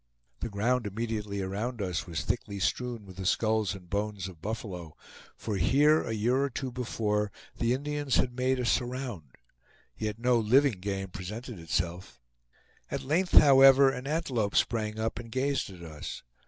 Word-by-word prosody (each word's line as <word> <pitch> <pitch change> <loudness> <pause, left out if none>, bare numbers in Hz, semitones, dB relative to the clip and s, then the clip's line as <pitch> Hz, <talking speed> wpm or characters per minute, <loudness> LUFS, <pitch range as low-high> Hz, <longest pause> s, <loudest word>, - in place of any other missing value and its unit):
The - - -3
ground 115 +3 0
immediately 105 -1 -3
around 110 +6 -3
us 90 -3 -2
was 85 -2 -3
thickly 100 - -2
strewn 120 +2 -2
with 95 -1 -12
the 95 - -5
skulls 110 -2 +1
and 90 -2 -12
bones 100 0 -2
of 85 -4 -12
buffalo, 90 -6 -5 0.4
for 105 -3 -3
here 145 - +4
a - - -4
year 120 +5 +1
or 140 - 0
two 130 0 -4
before 105 -4 -1 0.3
the 120 +1 +2
Indians 145 0 -1
had 125 -1 +1
made 130 +1 +1
a 125 - -1
"surround"; 120 - -2 0.6
yet 105 -1 -3
no 120 +1 +3
living 120 0 +3
game 95 0 -3
presented 105 +5 -7
itself. 85 -4 -3 0.7
At - - -3
length, 175 +6 0
however, 135 -1 +8
an 125 +1 -6
antelope 135 -10 -1
sprang 110 -2 +1
up 110 +1 -2
and 115 -1 -9
gazed 135 0 0
at 90 -3 -11
us. 75 -3 -7
110 Hz, 165 wpm, -29 LUFS, 100-125 Hz, 0.7 s, however